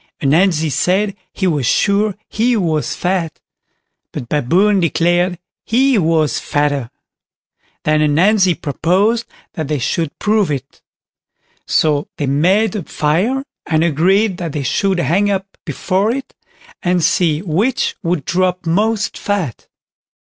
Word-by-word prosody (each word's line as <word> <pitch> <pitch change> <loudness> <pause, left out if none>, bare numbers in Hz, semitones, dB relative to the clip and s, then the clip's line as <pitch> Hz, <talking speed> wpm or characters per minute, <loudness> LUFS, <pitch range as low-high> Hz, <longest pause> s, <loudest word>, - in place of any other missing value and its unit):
Ananzi 160 +1 +2
said 195 +8 +1 0.2
he 190 - -3
was 150 -9 +1
sure 200 - +2
he 235 +2 +1
was 160 -6 -1
fat, 180 -3 -2 0.7
but 120 - -7
Baboon 185 +9 +2
declared 175 +2 +1 0.3
he 255 0 +2
was 160 -3 +1
fatter. 145 -4 -1 0.9
Then 155 0 +2
Ananzi 180 +5 +3
proposed 190 - 0 0.3
that 155 -3 -4
they 150 0 -1
should 150 +4 -2
prove 210 -3 +1
it; 140 -2 -5 0.9
so 150 -2 +1
they 145 - -1
made 180 +10 +2
a 210 - -2
fire, 185 - -1 0.2
and 160 0 +2
agreed 185 +5 +2
that 170 -4 -5
they 145 - -3
should 190 +7 0
hang 175 +6 +1
up 195 -1 -1 0.2
before 185 +6 0
it, 270 +2 -5 0.5
and 180 -1 +1
see 160 0 +1
which 200 +9 0
would 170 -6 -1
drop 185 +1 0
most 210 +6 0
fat. 195 - -3
175 Hz, 130 wpm, -17 LUFS, 155-200 Hz, 0.9 s, Ananzi